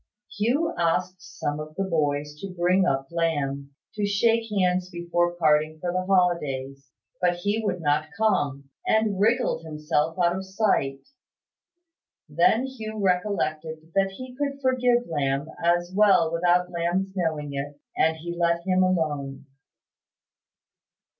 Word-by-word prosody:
Hugh 250 +10 +1
asked 180 +2 0
some 145 -5 -4
of 155 0 -8
the 195 - -1
boys 150 -5 -1
to 195 +2 -6
bring 180 +2 +3
up 135 0 -1
Lamb, 140 -5 -2 0.2
to 210 - -3
shake 225 +3 +2
hands 185 -3 +1
before 175 0 0
parting 155 -1 +2
for 175 +1 -2
the 185 0 0
holidays; 140 -8 0 0.3
but 175 -1 +3
he 205 +5 -1
would 180 -4 -2
not 150 0 +1
come, 140 -11 0 0.2
and 220 -3 +2
wriggled 230 -3 +2
himself 155 +1 -1
out 175 -1 +2
of 190 - -4
sight. 190 -9 0 1.3
Then 170 - +3
Hugh 220 -5 -6
recollected 165 -5 -1
that 195 0 +1
he 255 +4 -9
could 280 0 -3
forgive 250 -2 +2
Lamb 140 -3 -1 0.2
as 175 +1 +1
well 195 -6 +4
without 175 +1 +2
Lamb's 175 +3 -1
knowing 155 -5 -2
it; 145 +1 -5 0.2
and 160 0 +2
he 170 +2 -6
let 170 0 +1
him 185 -1 +2
alone. 145 -7 -1
175 Hz, 135 wpm, -25 LUFS, 155-195 Hz, 1.3 s, well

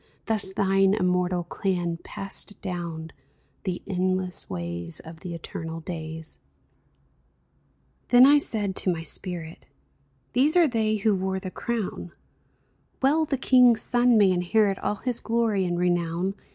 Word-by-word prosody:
Thus 215 -3 -1
thine 195 0 +2
immortal 180 -2 0
clan 175 -1 -2
Passed 195 +3 -4
down 170 -3 -5 0.5
the 180 -2 -3
endless 185 0 -2
ways 85 -2 -3
Of 160 0 -11
the 175 -1 -6
eternal 165 0 -6
days! 160 -1 -7 1.7
Then 265 +4 +7
said 215 -7 0
I - - -8
to 185 - -1
my 165 -1 -6
spirit: 170 -2 -1 0.3
*' 135 -2 -41
These 285 +7 +3
are 340 -2 +6
they 220 -4 0
who 215 0 +1
wore 190 0 -1
the 185 -1 -7
crown; 215 -7 -4 0.9
Well 310 +4 +3
the 280 -2 -1
king's 250 -3 +5
sons 245 -1 +3
may 200 -3 +5
inherit 195 +3 +1
All 210 - -1
his 245 +3 -2
glory 225 -4 0
and 175 -1 -1
renown. 175 +1 0
185 Hz, 140 wpm, -25 LUFS, 170-220 Hz, 1.7 s, Then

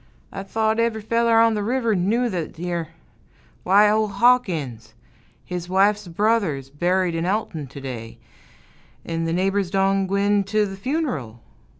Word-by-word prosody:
I - - -6
thote 220 +3 -1
ev'ry 230 -1 +1
feller 230 +1 +2
on 230 0 +4
th' 210 - -1
river 230 +1 0
knew 210 +7 +1
thet 175 -7 -4
yere 170 -1 -3 0.7
why, 200 +3 +5
ol' 215 +1 +2
Hawkins, 175 - +1 0.5
his 180 -1 -5
wife's 200 +2 +2
brother's 170 - 0
buried 180 +4 0
in 165 +1 -2
Alton 185 -7 -2
to 140 +2 -10
day, 120 -4 -7 0.9
'n' 165 0 -2
th' 165 - -1
neighbors 195 +1 0
done 195 0 +1
gwine 200 +1 +2
t' 210 +2 +1
th' 195 -1 -6
fun'ral. 180 - -3
195 Hz, 150 wpm, -22 LUFS, 165-220 Hz, 0.9 s, why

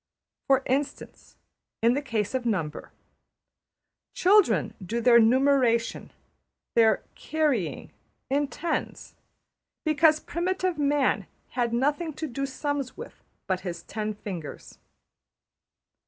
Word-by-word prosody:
For 270 -1 +4
instance, 275 +2 -3 0.5
in 235 +1 +5
the 285 - 0
case 225 -6 -2
of 260 -1 -1
number: 185 -10 -2 1.2
Children 360 - +4
do 225 +6 -2
their 235 0 +6
numeration, 245 -1 +2 0.6
their 225 -1 +4
``carrying,'' 295 - -1 0.4
in 285 +2 +1
tens, 325 +4 -4 0.7
because 310 0 +4
primitive 365 0 -2
man 285 -2 +1 0.2
had 240 -2 -1
nothing 290 +7 0
to 315 - -5
do 275 0 -3
sums 280 0 -3
with 470 - -10 0.2
but 185 -1 -1
his 175 -3 -6
ten 215 0 -4
fingers. 180 -7 -8
260 Hz, 105 wpm, -26 LUFS, 225-295 Hz, 1.2 s, their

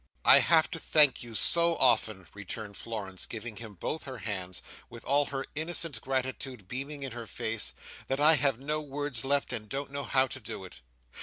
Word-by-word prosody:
"I - - +9
have 165 -1 +3
to 165 - -3
thank 150 -5 +5
you 120 -2 -9
so 170 +7 +6
often," 110 - +2
returned 100 +1 -8
Florence, 100 -5 -6
giving 115 -1 -7
him 110 -2 -9
both 150 - -5
her 130 -2 -6
hands, 95 -4 -4 0.3
with 115 - -12
all 145 +2 +2
her 135 -1 -5
innocent 155 -5 -1
gratitude 130 -4 -4
beaming 140 +5 -4
in 135 - -4
her 120 -1 -8
face, 110 0 -2 0.3
"that 135 +1 -2
I 155 +2 +7
have 135 -4 +1
no 150 +3 -2
words 145 -4 -4
left, 140 -1 +1
and 110 -3 -5
don't 140 +2 -3
know 140 0 -3
how 130 -1 +3
to 130 - -7
do - - -8
it." - - -13
130 Hz, 190 wpm, -29 LUFS, 110-145 Hz, 0.3 s, I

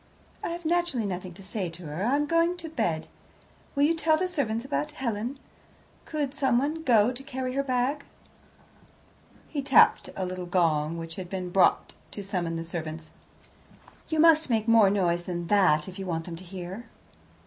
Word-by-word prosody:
"I - - -2
have 340 0 -6
naturally 340 -8 +1
nothing 180 -2 -5
to 195 - -12
say 190 -2 -3
to 170 +1 -11
her; 150 +5 -4
I 245 +6 +2
am 295 +1 +1
going 335 +3 +2
to 330 -2 -7
bed. 175 - -1 0.7
Will 280 - +3
you 310 +3 +4
tell 320 -1 +2
the 370 +3 0
servants 245 -9 -2
about 300 +2 -2
Helen? 240 -1 -3 0.7
Could 290 -3 -2
someone 280 +3 +1
go 235 -6 +4
to 255 +1 -7
carry 260 -2 -4
her 275 - +1
bag?" 270 +2 0 1.4
He 290 - -3
tapped 275 - +5
a 190 - -2
little 180 0 -5
gong, 165 -3 +1
which 165 0 -6
had 185 -2 -6
been 185 -2 -4
bought 190 0 +3 0.2
to 205 - -6
summon 180 -4 -2
the 165 0 -4
servants. 160 -1 -6 1.0
"You 315 -1 0
must 315 -2 +5
make 225 -2 +1
more 225 -3 +6
noise 175 -3 +1
than 175 -1 -3
that 185 -7 +4
if 190 0 -8
you 190 - -5
want 165 -2 -2
them 170 - -6
to 180 - -10
hear." 185 +5 -8
220 Hz, 180 wpm, -27 LUFS, 180-285 Hz, 1.4 s, more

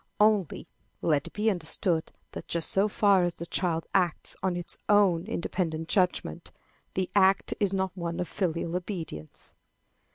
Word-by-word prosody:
Only, 210 -6 +2 0.4
let 150 -3 +2
it - - -11
be 215 +1 +2
understood 170 -1 -1 0.2
that - - -8
just 170 -1 -1
so 195 +2 +3
far 200 -2 +4
as 175 -1 -1
the 170 - -6
child 165 -2 -1
acts 180 -4 +1
on 185 -2 0
its 175 0 -5
own 195 -4 +4
independent 165 -5 -2
judgment, 180 - 0 0.4
the 185 -1 0
act 195 -1 +4
is 200 -3 +2
not 190 -1 -1
one 170 -2 -3
of 180 - -1
filial 170 -2 -2
obedience. 170 - -6
180 Hz, 155 wpm, -28 LUFS, 165-195 Hz, 0.4 s, far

